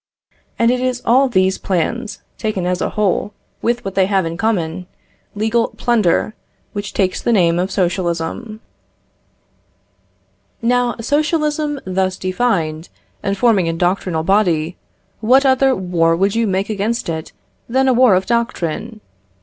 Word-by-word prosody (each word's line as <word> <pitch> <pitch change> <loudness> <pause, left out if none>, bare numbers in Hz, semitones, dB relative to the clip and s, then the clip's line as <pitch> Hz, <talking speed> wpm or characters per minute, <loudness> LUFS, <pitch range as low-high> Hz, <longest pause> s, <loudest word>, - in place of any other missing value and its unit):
And 230 +1 +3
it 250 - 0
is 250 -1 -2
all 260 +3 +4
these 190 -4 +2
plans, 210 +5 -2 0.2
taken 210 -5 -2
as 180 0 -1
a - - 0
whole, 205 0 0 0.3
with 240 -1 -1
what 195 - -4
they 190 -1 +2
have 195 -3 +1
in 165 0 -3
common, 180 -4 -1 0.5
legal, 225 +3 +1
plunder, 220 -3 +1 0.4
which 205 -1 -4
takes 185 -2 0
the - - 0
name 175 -5 +3
of 185 +2 0
socialism. 185 +4 -2 2.0
Now 245 0 +1
socialism, 300 +2 0
thus 185 0 -1
defined, 180 -5 -1 0.3
and 200 0 -2
forming 195 -6 +3
a - - -1
doctrinal 175 -1 0
body, 175 -3 +1 0.4
what 255 +5 +4
other 265 0 +4
war 170 -3 +1
would 195 +3 +1
you 230 -1 +1
make 195 +2 -1
against 215 +4 -2
it 160 -1 -4 0.4
than 265 +2 +2
a 260 - +4
war 245 -5 +5
of 185 +1 +1
doctrine? 225 -2 -2
200 Hz, 140 wpm, -18 LUFS, 180-235 Hz, 2.0 s, war